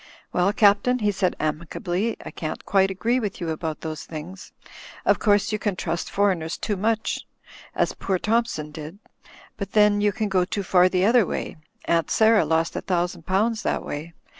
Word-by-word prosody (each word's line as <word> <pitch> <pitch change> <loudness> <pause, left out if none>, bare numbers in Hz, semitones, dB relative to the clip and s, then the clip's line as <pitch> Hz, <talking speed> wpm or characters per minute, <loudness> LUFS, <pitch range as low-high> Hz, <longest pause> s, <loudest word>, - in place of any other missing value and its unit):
'Well, 180 +2 +3
Captain," 205 +4 +4
he 210 -4 +1
said, 185 -2 0
amicably. 175 +7 -2
"I - - -6
can't 155 -1 -5
quite 195 -1 +3
agree 230 +6 0
with 210 -5 -4
you 170 - -3
about 160 -1 -4
those 155 -1 -5
things. 165 +4 -9 0.5
Of - - +3
course, 205 -1 +2
you 215 - -1
can 200 -1 -1
trust 170 -1 -3
foreigners 185 -5 0
too 210 - -2
much 220 +3 -1 0.5
as - - +1
poor 190 -1 -1
Thompson 215 -8 -1
did; 155 +4 -8 0.6
but 200 -1 -6
then 210 -1 +4
you 205 0 +3
can 215 0 -2
go 190 -2 +2
too 200 +2 -3
far 180 0 +4
the 185 0 +2
other 230 -2 +4
way. - - -4 0.3
Aunt 165 -2 +1
Sarah 220 -1 +4
lost 160 +1 0
a - - -2
thousand 175 -2 -2
pounds 215 +4 +1
that - - -1
way. 160 +3 -6
190 Hz, 185 wpm, -24 LUFS, 170-210 Hz, 0.6 s, Captain